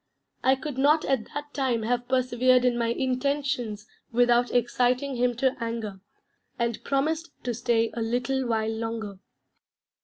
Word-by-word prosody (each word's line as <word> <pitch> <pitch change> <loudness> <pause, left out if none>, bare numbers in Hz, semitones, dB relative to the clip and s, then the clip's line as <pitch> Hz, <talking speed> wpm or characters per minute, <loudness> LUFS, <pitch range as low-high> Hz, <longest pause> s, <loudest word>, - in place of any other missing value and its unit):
I 260 +1 +5
could 270 -1 -6
not 300 +3 +4
at 265 -5 0
that 290 0 -5
time 255 -5 0
have 245 +2 -1
persevered 255 -1 +3
in 245 -1 +3
my 235 -1 0
intentions 255 -3 -1 0.3
without 240 +1 +3
exciting 250 +3 +1
him 245 0 +1
to 260 +2 +1
anger; 225 -4 -4 0.6
and 235 -2 -2
promised 315 +4 0
to 245 - -1
stay 230 -1 +1
a 235 - -4
little 250 +3 -1
while 220 -1 0
longer. 220 -3 -4
245 Hz, 145 wpm, -26 LUFS, 230-265 Hz, 0.6 s, I